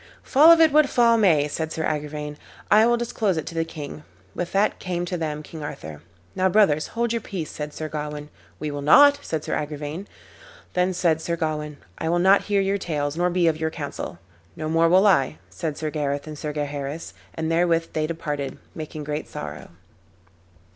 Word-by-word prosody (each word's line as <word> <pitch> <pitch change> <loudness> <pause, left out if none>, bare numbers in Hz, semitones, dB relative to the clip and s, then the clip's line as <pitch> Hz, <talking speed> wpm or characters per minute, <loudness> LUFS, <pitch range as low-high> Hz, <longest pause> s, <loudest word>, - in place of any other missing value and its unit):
"Fall 300 +5 +6
of 335 - +7
it 320 -2 +6
what 300 -1 +5
fall 235 -1 +4
may," 165 -10 +4
said 160 +2 -3
Sir 160 - -3
Agrivain, 150 -1 -3 0.4
"I 215 +2 +7
will 240 0 +3
disclose 220 -6 -1
it 160 - -2
to - - -7
the 165 0 0
king." 155 -2 -8 0.3
With 175 - -4
that 200 +2 +1
came 175 -1 -3
to 180 - -3
them 155 -3 -3
King 160 +1 -9
Arthur. 80 - -7 0.3
"Now, 190 0 +2
brothers, 175 -7 +3
hold 235 0 +1
your 230 - -1
peace," 185 -7 -5
said 150 0 -5
Sir 155 +1 -5
Gawain. 150 -1 -5 0.3
"We 150 -1 -3
will 145 0 -4
not," 285 - +7
said 160 - -3
Sir - - -3
Agrivain. 150 +5 -5 0.7
Then 180 0 +1
said 165 -3 +2
Sir 170 +1 -1
Gawain, 150 -2 -3 0.2
"I 160 - -1
will 175 - +2
not 190 +3 +4
hear 200 -1 +2
your 195 +1 0
tales 145 -5 -2
nor 175 +1 +1
be 175 -1 +2
of 160 -1 +1
your 160 0 0
counsel." 145 - -6 0.4
"No 155 - -4
more 165 +1 +3
will 185 +4 +5
I," 155 -7 +3
said 155 -4 -4
Sir 155 -1 -3
Gareth 145 -2 -2
and 155 -1 -7
Sir 150 0 -4
Gaheris, 145 +1 -4 0.2
and 160 0 -2
therewith 165 0 +2
they 155 -1 0
departed, 150 -4 -4 0.2
making 155 -1 -6
great 150 +1 -4
sorrow. 75 0 -7
160 Hz, 200 wpm, -24 LUFS, 150-185 Hz, 0.7 s, of